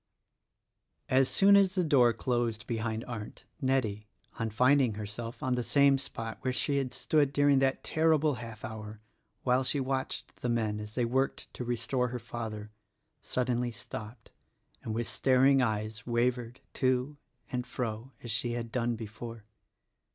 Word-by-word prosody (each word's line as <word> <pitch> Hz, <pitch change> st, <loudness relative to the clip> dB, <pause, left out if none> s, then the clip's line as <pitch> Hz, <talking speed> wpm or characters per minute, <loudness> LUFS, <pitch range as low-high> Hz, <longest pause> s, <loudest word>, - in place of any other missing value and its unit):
As 130 Hz, 0 st, +4 dB
soon 200 Hz, +1 st, +6 dB
as 195 Hz, -1 st, +4 dB
the 185 Hz, -, +2 dB
door 135 Hz, -7 st, +5 dB
closed 115 Hz, -1 st, -1 dB
behind 110 Hz, -1 st, -2 dB
Arndt, 110 Hz, -4 st, -7 dB, 0.2 s
Nettie, 115 Hz, -6 st, 0 dB, 0.3 s
on 115 Hz, -, 0 dB
finding 125 Hz, +1 st, +3 dB
herself 110 Hz, +3 st, -6 dB
on 130 Hz, -, +1 dB
the 125 Hz, -, 0 dB
same 140 Hz, +2 st, +4 dB
spot 115 Hz, -4 st, -6 dB
where 130 Hz, -, 0 dB
she 140 Hz, +3 st, 0 dB
had 135 Hz, -2 st, -1 dB
stood 145 Hz, +1 st, +2 dB
during 145 Hz, -1 st, +4 dB
that 135 Hz, 0 st, +1 dB
terrible 155 Hz, -2 st, +3 dB
half 115 Hz, -3 st, -8 dB
hour 110 Hz, -1 st, -7 dB, 0.4 s
while 125 Hz, +1 st, +3 dB
she 140 Hz, +2 st, 0 dB
watched 130 Hz, 0 st, -3 dB
the 125 Hz, -, -3 dB
men 110 Hz, -3 st, 0 dB
as 105 Hz, 0 st, -8 dB
they 125 Hz, -, +2 dB
worked 130 Hz, +3 st, -1 dB
to -, -, -5 dB
restore 120 Hz, +1 st, 0 dB
her 125 Hz, 0 st, -4 dB
father, 110 Hz, -3 st, -6 dB, 0.5 s
suddenly 125 Hz, -1 st, 0 dB
stopped, 115 Hz, -1 st, -8 dB, 0.5 s
and 110 Hz, -, -4 dB
with 120 Hz, +1 st, -1 dB
staring 135 Hz, +2 st, +4 dB
eyes 110 Hz, -2 st, -2 dB
wavered 120 Hz, 0 st, 0 dB
to 130 Hz, +2 st, 0 dB, 0.3 s
and 125 Hz, 0 st, -2 dB
fro 120 Hz, 0 st, -4 dB
as 120 Hz, -, -4 dB
she 120 Hz, +2 st, 0 dB
had 115 Hz, -1 st, -4 dB
done 120 Hz, -1 st, 0 dB
before. 115 Hz, +1 st, -8 dB
120 Hz, 155 wpm, -30 LUFS, 110-130 Hz, 0.5 s, soon